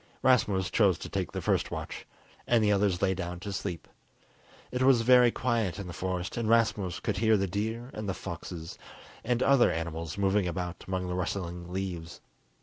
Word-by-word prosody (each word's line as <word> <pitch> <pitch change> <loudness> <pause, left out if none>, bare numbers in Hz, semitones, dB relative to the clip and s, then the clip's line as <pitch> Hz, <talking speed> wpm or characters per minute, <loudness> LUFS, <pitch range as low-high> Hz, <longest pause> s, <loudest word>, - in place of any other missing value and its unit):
Rasmus 105 -7 +3
chose 100 -6 +4
to - - -7
take - - -2
the - - -4
first - - +1
watch, - - -6 0.4
and 115 -2 +4
the 105 - +3
others 100 -2 +1
lay 95 -1 +3
down 90 -1 -5
to 100 0 -5
sleep. 90 -4 -4 0.8
It 125 - -2
was 130 -2 +5
very 125 0 +7
quiet 115 -6 -1
in 100 - -5
the 90 - -7
forest, 90 +2 -3
and 115 -2 -1
Rasmus 105 -6 +2
could - - -2
hear 110 +1 +4
the 95 - +1
deer 110 +6 -3
and 110 -2 -4
foxes 85 -2 -7 0.4
and 120 +1 +1
other 135 -8 +5
animals 80 +1 -4
moving 100 -1 +2
about 90 0 -4
among 95 -1 -2
the 90 - -2
rustling 90 -1 -3
leaves. 90 -3 -4
95 Hz, 180 wpm, -29 LUFS, 90-110 Hz, 0.8 s, very